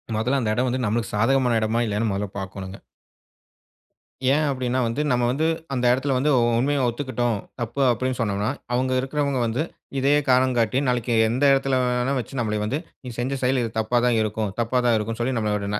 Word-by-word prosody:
முதல்ல 125 +6 +1
அந்த 115 -4 -1
இடம் 125 +3 0
வந்து 130 +1 -1
நம்மளுக்கு 110 +2 -1
சாதகமான 125 +2 +2
இடமா? 110 +2 0
இல்லையான்னு 105 +1 -1
முதல்ல 100 +1 -2
பார்க்கணுங்க. 95 0 -7 1.6
ஏன் 155 +1 +2
அப்படீன்னா 130 -1 -1
வந்து, 115 +6 -2
நம்ம 125 -1 +2
வந்து 155 +5 0 0.3
அந்த 125 -2 0
இடத்தில 135 +1 0
வந்து 140 +4 +1
உ - - +4 0.2
உண்மைய 140 +1 +1
ஒத்துக்கிட்டோம். 120 -2 -1 0.2
தப்பு 120 +4 -3
அப்படீன்னு 130 +1 -2
சொன்னம்னா, 105 -1 0 0.2
அவுங்க 130 +1 +1
இருக்கிறவங்க 140 0 -1
வந்து 115 +6 -1 0.4
இதையே 140 +2 +3
காரணம் 130 0 +3
காட்டி, 115 +1 +1
நாளைக்கு 125 -1 0 0.2
எந்த 125 +5 -1
இடத்தில 135 -1 +1
வேணா 125 +2 0
வச்சு 130 +2 -5
நம்மள 105 -2 -1
வந்து, 130 +8 -1 0.3
நீ - - -5
செஞ்ச 130 +2 -2
செயல் 130 0 +2
இது 115 - -3
தப்பா 110 +2 +1
தான் 120 -2 +3
இருக்கும். 110 -1 -2
தப்பா 120 +2 +1
தான் 120 -2 +4
இருக்கும்ன்னு 115 +2 -3
சொல்லி 130 +1 -1
நம்மள 105 -1 -1
125 Hz, 185 wpm, -23 LUFS, 110-130 Hz, 1.6 s, உ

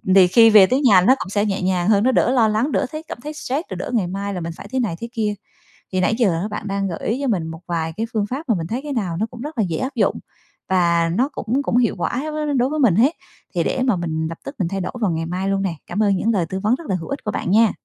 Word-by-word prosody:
thì 190 -2 +8
khi 225 +5 +6
về 210 -3 +8
tới 260 +6 +1
nhà 205 -10 +6
nó 255 +9 +5
cũng - - -5
sẽ 205 +1 +1
nhẹ 195 -2 -1
nhàng 180 0 +1
hơn, 205 -1 +4
nó 260 - +4
đỡ 245 - +2
lo 235 -4 +4
lắng, 220 +7 0
đỡ 275 - +1
thấy 310 0 -6
cảm - - -6
thấy 300 +1 -5
stress, 290 0 -3
rồi 190 - -5
đỡ 180 - -5
ngày 205 -7 +1
mai 200 +2 -4
là 180 - -4
mình 165 0 -4
phải - - -10
thế 260 - 0
này 215 -9 -1
thế 235 - -6
kia. 215 -3 0 0.6
Thì 185 - +1
nãy 215 - +2
giờ 200 -5 +1
bạn 210 0 -5
đang 195 0 -1
gợi 170 - -5
ý 230 +5 -1
cho 275 - -1
mình 180 -9 0
một 165 +1 -8
vài 165 -2 -2
cái 225 - -1
phương 215 -2 +1
pháp 270 +4 -5
mà 225 - +4
mình 165 - -4
thấy 235 +7 -3
cái 290 - -4
nào 190 -9 -2
nó 215 - 0
cũng 235 - -9
rất 295 0 -7
là 220 - +2
dễ 160 - -1
áp 260 +1 -3
dụng - - +2 0.5
và 170 -2 +2
nó 260 +7 +2
cũng 265 0 -2
cũng 240 - +1
hiệu 240 -3 +2
quả 245 +10 -2 0.3
đối 250 +2 +2
với 305 +1 -2
mình 235 - +4
hết, 260 +9 +4 0.4
thì - - +2
để - - -1
mà 245 -6 +2
mình 160 -2 -2
lập 165 - -7
tức 275 - -7
mình 180 - +1
thay 195 +2 -3
đổi - - -4
vào 200 -5 +2
ngày 165 0 -2
mai 185 +3 -2
luôn 195 0 0
nè. 185 -4 -2
Cảm 215 - 0
ơn 200 -2 +3
những 225 - +1
lời 180 -5 +1
tư 190 - -3
vấn 215 +5 +2
rất 315 +3 -10
là 190 - +1
hữu 165 - -6
ích 275 - -4
của 210 - -1
bạn 180 - -2
nha! 220 +1 +5
205 Hz, 315 wpm, -21 LUFS, 180-245 Hz, 0.6 s, thì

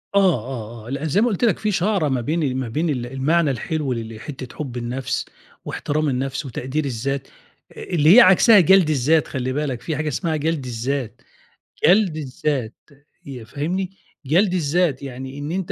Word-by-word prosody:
آه، 200 - +7
آه، 115 -2 -6
آه، - - -9
لأ، 140 +3 -3
زي 175 +7 +2
ما 240 - +3
قُلت 215 -1 -2
لك 225 -6 +3
في 215 -1 0
شعرة 190 -3 +1
ما 130 -2 0
بين 145 -1 -1
ما 130 - -2
بين 160 +7 -1
ال 125 -5 -2
المعنى 140 +5 +1
الحلو 140 +2 -2
ل 115 -1 -6
لحتة 130 +2 -8
حُب 130 -5 -5
النَفْس 120 +2 -3 0.4
واحترام 150 0 -1
النَفْس 135 +2 -2
وتقدير 135 +4 -3
الذات 135 +2 -3 0.4
آآ - - -10
اللي 165 +1 +4
هي 250 - +10
عكسها 200 +3 +7
جَلْد 185 -1 +5
الذات 155 +2 +2
خلّي 130 -1 -3
بالك 135 -4 -2
في 155 +4 -3
حاجة 150 +1 -2
اسمها 160 +2 -1
جَلْد 155 -2 -1
الذات، 125 0 -3 0.6
جَلْد 180 -2 +4
الذات 135 -4 -3 0.5
يأ 130 -4 -8
فاهمني، 170 - -3 0.4
جَلْد 180 +7 +3
الذات 160 -4 +1
يعني 130 +1 -7
إن 145 +2 -5
أنت 185 0 -3
145 Hz, 180 wpm, -21 LUFS, 130-165 Hz, 0.6 s, هي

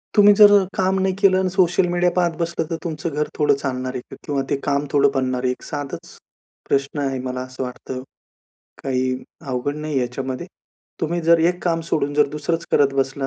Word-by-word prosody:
तुम्ही 205 -1 +8
जर 205 0 +8
अ, 205 -1 +6
काम 190 0 +1
नाही 190 0 +1
केलं 190 -2 +5
अन् 190 -1 +1
सोशल 180 -1 +3
मीडिया 175 0 +2
पाहत 175 -2 +1
बसलं 170 -1 -2
तर 165 - -1
तुमचं 165 -1 -3
घर 150 +1 0
थोडं 150 -2 +4
चालणार 130 -2 -3
आहे 130 - -4
का? - - -12
किंवा 140 -2 -1
ते - - +2
काम 140 0 +1
थोडं 140 -1 +4
बनणार 130 -1 0
आहे? 125 - +2
एक 125 - -7
साधंच 145 -2 -6 0.5
प्रश्न 140 +2 0
आहे 135 -2 -1
मला 125 0 -3
असं 130 +1 -6
वाटतं. 130 0 -6 0.8
काही 130 -1 0 0.4
अवघड 130 +3 -2
नाहीये 150 -3 -2
याच्यामध्ये. 130 +5 -4 0.5
तुम्ही 170 +2 -1
जर 165 0 +5
एक 180 0 -9
काम 165 -2 +1
सोडून 145 -1 0
जर 150 0 +4
दुसरंच 165 +3 -2
करत 140 -1 +4
बसला. 135 0 -1
145 Hz, 200 wpm, -21 LUFS, 135-175 Hz, 0.8 s, तुम्ही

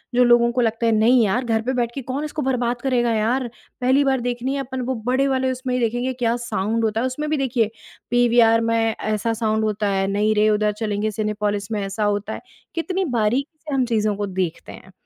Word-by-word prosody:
जो 250 - +5
लोगों 240 -1 +5
को 245 +1 0
लगता 230 0 0
है 230 - +3
नहीं 225 +3 +4
यार 240 +6 0
घर 225 -1 +1
पे 255 +3 -2
बैठ 240 -2 0
के 275 - -3
कौन 265 +3 -4
इसको 305 0 -4
बर्बाद 245 -3 -1
करेगा 245 -3 +1
यार, 235 +4 0 0.3
पहली 260 +3 +3
बार 270 -1 +1
देखनी 245 +2 -2
है 280 - -2
आपन 260 -1 -4
वो 260 +1 -2
बड़े 265 +2 +2
वाले 260 -1 +1
उसमें 255 0 -3
ही 250 - +1
देखेंगे 245 +2 -1
क्या 240 -2 0
साउंड 225 -1 -2
होता 220 0 0
है 255 - 0
उसमें 300 +4 -3
भी 310 - +1
देखिए 245 -5 0 0.4
पीवीआर 235 -2 +4
में 230 - +2 0.2
ऐसा 215 +1 -1
साउंड 220 -1 0
होता 215 -1 -1
है, 195 0 0
नहीं 205 +2 +1
रे 215 +1 +4
उधर 210 0 +2
चलेंगे 215 -1 -1
सिनेपोलिस 210 -1 -2
में 210 -2 -1
ऐसा 195 +2 -3
होता 205 +1 -1
है, - - -7 0.3
कितनी 370 +3 -1
बारीकी 260 +9 0
से 295 - -3
हम 260 -2 +2
चीज़ों 215 -3 0
को 205 +1 -2
देखते 185 -3 -3
हैं। 190 - -13
235 Hz, 225 wpm, -22 LUFS, 215-255 Hz, 0.4 s, जो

